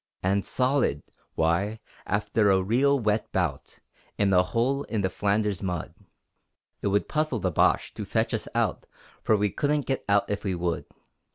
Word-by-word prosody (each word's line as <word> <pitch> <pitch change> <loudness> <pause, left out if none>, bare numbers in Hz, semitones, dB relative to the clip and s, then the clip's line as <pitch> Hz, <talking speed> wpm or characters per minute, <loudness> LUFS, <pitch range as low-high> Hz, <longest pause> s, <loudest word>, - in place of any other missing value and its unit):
And 100 +1 +1
solid! 125 - +1 0.3
Why, 85 +7 +1 0.3
after 105 +1 +1
a 95 -1 +3
real 135 +8 +3
wet 110 -1 0
bout - - -2 0.4
In 100 -1 +2
a 90 - +6
hole 120 +9 0
in 110 -3 -2
the 95 -1 0
Flanders 100 0 0
mud, 90 -4 -3 0.9
It - - -1
would 100 +1 +1
puzzle 155 -5 0
the 95 -4 -1
Boche - - +2
to - - -5
fetch - - -1
us - - -2
out, - - 0 0.3
For 110 - +3
we 105 -1 +1
couldn't 145 -1 0
get 135 - -2
out 100 0 +3
if 105 - -3
we 95 -3 -1
would! 85 -1 -2
105 Hz, 170 wpm, -26 LUFS, 95-115 Hz, 0.9 s, a